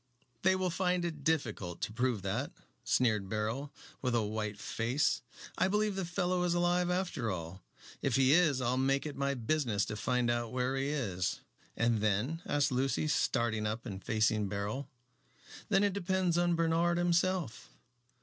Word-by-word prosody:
"They 190 0 +4
will 185 -1 0
find 180 0 0
it 155 -4 -5
difficult 110 - -1
to 105 - -2
prove 120 -4 0
that," 110 +9 -2 0.3
sneered 110 -6 +1
Beryl, 110 +7 -2 0.3
with 125 -2 0
a 115 - +2
white 105 -1 -3
face. 120 +8 0 0.4
"I - - +4
believe 210 +1 +1
the 190 -2 -2
fellow 180 +1 0
is 175 -1 +1
alive 175 0 +2
after 180 -10 -1
all. 90 0 -5 0.4
If 135 - +1
he 135 0 +4
is 155 -6 +4
I'll 125 +1 +1
make 135 +2 +1
it 150 - -5
my 140 0 0
business 120 -4 0
to 105 - -5
find 120 +2 +1
out 120 -1 -2
where 125 +1 0
he 135 0 -1
is." 105 -12 -2 0.4
"And 115 -1 +2
then?" 110 - 0
asked 145 0 +2
Lucy, 135 +4 0
starting 115 -6 +1
up 110 +3 -4
and 95 -4 -6
facing 110 -2 +1
Beryl. 105 +7 -3 0.8
"Then 200 -1 +4
it 205 -2 +2
depends 185 -2 0
upon 175 0 +2
Bernard 165 +1 +2
himself." 175 -5 0
135 Hz, 170 wpm, -32 LUFS, 110-175 Hz, 0.8 s, They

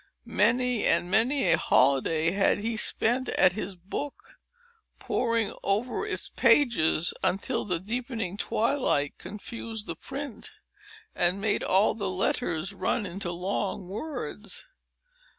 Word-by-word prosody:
Many 250 -2 +2
and 175 - +2
many 225 -1 +4
a 170 - +5
holiday 140 +5 +3
had 195 +1 +2
he 225 +2 -2
spent 240 +4 +2
at 185 - +4
his 200 -1 -5
book, 200 +11 -7 0.6
poring 230 -3 0
over 235 - -1
its 425 - -1
pages 180 - +3
until 230 +6 -1
the 180 -4 -1
deepening 225 -1 -4
twilight 220 - 0
confused 220 +1 -6
the - - -5
print, 275 -4 -6 0.6
and 175 +2 +1
made 205 0 0
all 195 +3 +3
the 200 -3 -3
letters 185 -1 -1
run 195 +3 -1
into 185 -1 -4
long 185 +1 -3
words. 215 - -5
205 Hz, 120 wpm, -27 LUFS, 180-235 Hz, 0.6 s, a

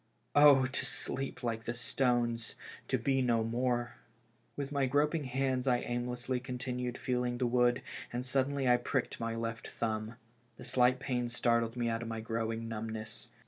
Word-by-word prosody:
Oh! 145 -2 +7
to 130 - -1
sleep 135 0 -3
like 115 -1 -2
the 120 - -2
stones, 120 -1 0 0.3
to - - +1
be 135 -1 +1
no 120 -3 +2
more! 120 +1 -1 0.6
With 140 0 -4
my 140 -2 +1
groping 150 +3 +2
hands 130 0 0
I 125 -1 +4
aimlessly 125 +1 -2
continued 125 -1 -3
feeling 125 -1 -1
the 125 - +1
wood, 120 0 +3 0.3
and 125 +1 -3
suddenly 135 +1 +1
I 125 0 +6
pricked 125 +1 -2
my 115 0 -2
left 115 0 -4
thumb. 110 0 -3 0.4
The - - -10
slight 125 0 +4
pain 125 -2 -1
startled 115 0 +1
me 120 -1 0
out 115 0 -1
of 115 - -5
my 115 0 -3
growing 115 0 -2
numbness. 110 0 -5
125 Hz, 165 wpm, -33 LUFS, 115-130 Hz, 0.6 s, Oh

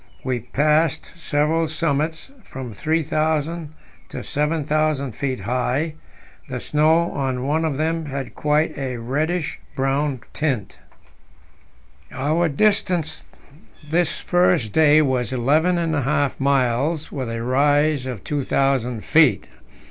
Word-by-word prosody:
We 125 -2 -1
passed 150 +5 +1
several 160 0 0
summits 155 - -2
from 130 - -8
3,000 155 - -1 0.4
to - - -6
7,000 150 -2 0
feet 130 +3 -3
high; 130 +6 -1 0.6
the 125 -1 -3
snow 160 +5 +2
on 130 -2 -2
one 155 +3 +1
of 155 -4 -1
them 160 +1 -1
had 135 -1 -5
quite 150 +1 +1
a 130 -2 -3
reddish 150 +8 -2 0.2
brown 135 -1 0
tint. 135 -10 -2 1.3
Our 155 +5 0
distance 180 -1 +1 0.7
this 175 +1 +1
first 175 - +2
day 155 -1 +5
was 125 -5 0
eleven 150 +8 +2
and 165 -2 0
a 145 - +1
half 140 +1 0
miles, 140 +3 +1
with 130 -4 -4
a 115 0 -4
rise 145 +2 +2
of 125 -6 -6
2,000 135 -5 0
feet. 150 -10 +4
145 Hz, 120 wpm, -22 LUFS, 130-160 Hz, 1.3 s, day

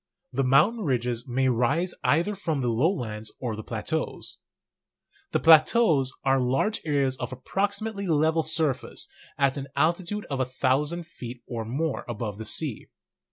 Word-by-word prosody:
The 135 - +1
mountain 155 - +4
ridges 125 -4 -1
may 130 +1 +1
rise 135 +9 +1
either 165 +11 +2
from 165 -8 -2
the 125 - 0
lowlands 115 - -1
or 120 -4 -3
the 110 - -6
plateaus. - - -4 0.9
The - - +2
plateaus 160 - +5
are 135 0 +4
large 135 - +1
areas 140 -4 +1
of - - -4
approximately 200 - -2
level 160 0 +3
surface 155 -6 -1 0.3
at 140 0 +2
an 140 0 -5
altitude 175 +5 0
of 135 - -1
a 130 - +2
thousand 140 +6 0
feet 125 -7 -9
or 115 -2 -4
more 140 +6 -2
above 105 -3 -4
the 110 - -5
sea. 135 +1 -3
140 Hz, 150 wpm, -26 LUFS, 125-165 Hz, 0.9 s, plateaus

